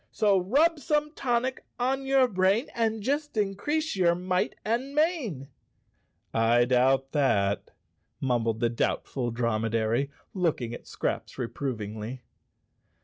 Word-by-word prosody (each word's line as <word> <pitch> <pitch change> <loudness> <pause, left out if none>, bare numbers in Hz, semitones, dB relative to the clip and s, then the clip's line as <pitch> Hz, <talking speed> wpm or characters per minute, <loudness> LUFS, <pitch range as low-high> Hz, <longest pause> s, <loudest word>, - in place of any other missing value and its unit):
" - - -45
So 200 -3 +5
rub 295 - +3
some 300 +2 0
tonic 255 -1 -1 0.2
on 265 +2 0
your 270 -1 +5
brain 195 +4 +2
And 225 -2 0
just 290 +1 -1
increase 255 +11 0
your 175 -3 +3
might 180 +1 -1
and 245 +6 -1
mane! 290 - 0 0.5
" - - -46
"I 115 +2 +4
doubt 130 +2 +2
that," 100 -9 +1 0.5
mumbled 115 -4 0
the 120 - +3
Doubtful 120 +1 -1
Dromedary, 115 +2 0 0.2
looking 155 - -1
at - - -9
Scraps - - -3
reprovingly. 115 -2 -4
180 Hz, 125 wpm, -27 LUFS, -, 0.5 s, So